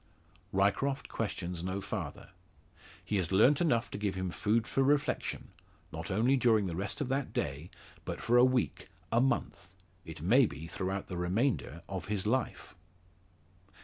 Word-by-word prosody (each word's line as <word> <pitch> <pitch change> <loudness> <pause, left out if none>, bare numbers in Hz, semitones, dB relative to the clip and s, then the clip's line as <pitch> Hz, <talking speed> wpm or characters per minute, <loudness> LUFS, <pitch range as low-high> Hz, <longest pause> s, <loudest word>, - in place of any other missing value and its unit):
Ryecroft 125 +8 +1
questions 90 -5 -3
no 95 +2 -2
farther. - - -5 0.7
He 105 - 0
has 90 -2 -1
learnt 125 - +5
enough 120 -9 +1
to - - -5
give 100 -2 -1
him 95 -1 -2
food 110 +5 +1
for 135 - 0
reflection 145 +2 0 0.4
not 80 +1 -6
only 115 +7 +3
during 115 -5 +3
the 85 -3 -3
rest 100 - -3
of 135 - -2
that 135 0 -1
day, 75 +6 -3 0.3
but - - -5
for 120 - +1
a 120 - +7
week, 130 -1 +1 0.2
a 115 - +4
month 130 -7 -1 0.3
it 80 -1 -9
may 120 +7 +5
be 80 - -8
throughout 95 +3 -3
the 90 - -6
remainder 90 - 0
of 95 -2 -5
his 105 -2 -1
life. 125 +3 -1
105 Hz, 160 wpm, -32 LUFS, 95-125 Hz, 0.7 s, a